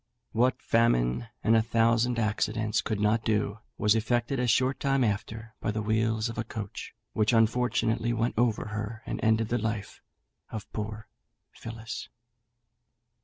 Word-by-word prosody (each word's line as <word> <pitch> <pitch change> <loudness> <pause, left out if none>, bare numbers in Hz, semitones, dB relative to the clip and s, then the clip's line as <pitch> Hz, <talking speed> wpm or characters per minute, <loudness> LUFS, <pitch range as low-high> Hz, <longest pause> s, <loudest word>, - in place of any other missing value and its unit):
What 125 +3 +1
famine 115 - +2 0.2
and 115 - +4
a 110 - +5
thousand 115 +1 +2
accidents 110 0 0
could 110 -2 -2
not 105 +2 +2
do, 105 -1 0 0.2
was 105 -1 +4
effected 120 +4 0
a 125 - +1
short 130 +3 +2
time 135 -1 +2
after 110 +1 -2
by - - -1
the 105 +1 -1
wheels 110 +1 +1
of 115 - -5
a - - 0
coach, 110 -3 -7 0.2
which 110 +2 +2
unfortunately 115 0 +2
went 115 0 0
over 115 -2 +1
her, 105 +2 -5
and - - -4
ended 110 0 +3
the 120 - +1
life 105 -2 -4 0.5
of 110 -3 -6
poor 110 0 -5 0.4
Phillis. 115 0 -7
110 Hz, 150 wpm, -28 LUFS, 110-115 Hz, 0.5 s, a